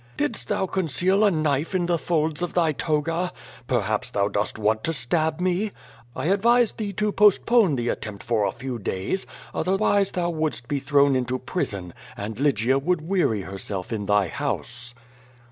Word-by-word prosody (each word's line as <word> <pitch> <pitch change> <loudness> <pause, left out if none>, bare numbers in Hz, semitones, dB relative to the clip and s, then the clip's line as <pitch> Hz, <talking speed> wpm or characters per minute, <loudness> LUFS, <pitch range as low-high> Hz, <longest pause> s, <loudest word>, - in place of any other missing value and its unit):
Didst 140 -4 -1
thou 190 - 0
conceal 190 +2 +1
a 210 - +6
knife 155 0 0
in 180 -2 +1
the 170 -1 +1
folds 155 +2 0
of 175 - -3
thy 165 -3 +3
toga? 165 +4 -1 0.4
Perhaps - - 0
thou 100 0 0
dost 105 +1 -1
want 110 0 +1
to 165 - 0
stab 155 +5 0
me? 185 +3 0 0.4
I - - -3
advise 230 +6 +4
thee 210 -2 -4
to 210 +2 0
postpone 210 - +4
the 120 -1 -1
attempt 105 -3 -4
for 115 -3 +1
a - - 0
few 125 0 -5
days, 95 - -2 0.3
otherwise 195 +1 +1
thou 175 -1 0
wouldst 155 -7 -2
be 145 +1 -1
thrown 140 0 +3
into 130 0 0
prison, 100 - -3 0.2
and 105 +3 -5
Lygia 135 -2 +2
would 175 +3 0
weary 170 - +1
herself 95 +1 -5
in 105 -2 -3
thy 105 -2 +3
house." 120 +7 -4
150 Hz, 170 wpm, -24 LUFS, 120-180 Hz, 0.4 s, a